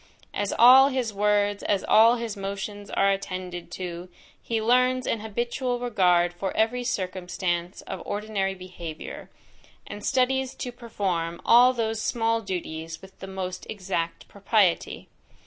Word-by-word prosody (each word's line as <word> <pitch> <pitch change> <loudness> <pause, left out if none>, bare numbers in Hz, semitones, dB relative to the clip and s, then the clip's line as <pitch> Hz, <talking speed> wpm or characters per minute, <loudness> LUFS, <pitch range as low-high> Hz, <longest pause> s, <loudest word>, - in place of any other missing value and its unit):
As 205 -1 -1
all 260 +3 +9
his 255 -5 -2
words, 205 0 +1
as 200 -2 0
all 230 +2 +6
his 230 -3 -4
motions 200 +1 -5
are 195 0 +2
attended 185 -2 -4
to, 180 -1 -6 0.3
he 230 -1 -2
learns 250 +3 +2
an 225 - -1
habitual 240 +3 -2
regard 180 -7 +2
for 190 +2 -3
every 240 +3 +1
circumstance 180 -4 -3
of 190 -3 -6
ordinary 205 -2 -2
behaviour, 180 -4 -8 0.6
and 205 - -8
studies 265 0 +1
to 245 - -5
perform 190 -8 -3
all 245 +2 +7
those 225 -3 -2
small 230 0 0
duties 165 -4 -5
with 190 0 -15
the 190 - -8
most 185 -1 -5
exact 185 -5 -3
propriety. 200 -3 +1
205 Hz, 135 wpm, -26 LUFS, 185-235 Hz, 0.6 s, all